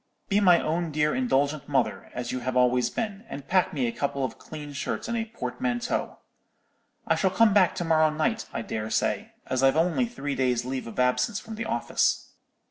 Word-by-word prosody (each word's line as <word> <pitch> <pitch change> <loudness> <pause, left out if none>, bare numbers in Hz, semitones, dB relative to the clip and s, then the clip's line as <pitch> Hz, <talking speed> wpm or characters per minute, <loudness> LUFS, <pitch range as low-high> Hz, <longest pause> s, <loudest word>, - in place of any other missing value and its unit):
Be 205 0 +3
my 180 -4 +6
own 165 +2 -1
dear 150 0 +1
indulgent 150 - 0
mother, 140 - 0
as 120 -1 -3
you 130 - -2
have 125 +1 -2
always 125 -1 +3
been, 215 - -4
and 140 0 -7
pack 185 -1 +3
me 135 -5 -1
a 115 - 0
couple 140 +1 -1
of 125 - -7
clean 150 -2 -8
shirts 140 - -3
in 235 - -2
a 225 -1 -1
portmanteau. 240 +2 -3 0.9
I - - +3
shall 190 - +2
come 210 +3 +4
back 190 -3 +4
to 175 -2 -2
morrow 160 -1 +4
night, 155 +9 -1
I - - -3
dare 110 -1 -4
say, - - -1
as 130 0 -1
I've 135 +2 +4
only 180 +9 +2
three 145 - -4
days' 125 -2 +1
leave 130 -1 -4
of 115 - -7
absence 125 - +2
from 225 - -9
the 225 +1 -4
office.' 120 - 0
155 Hz, 205 wpm, -27 LUFS, 130-205 Hz, 0.9 s, my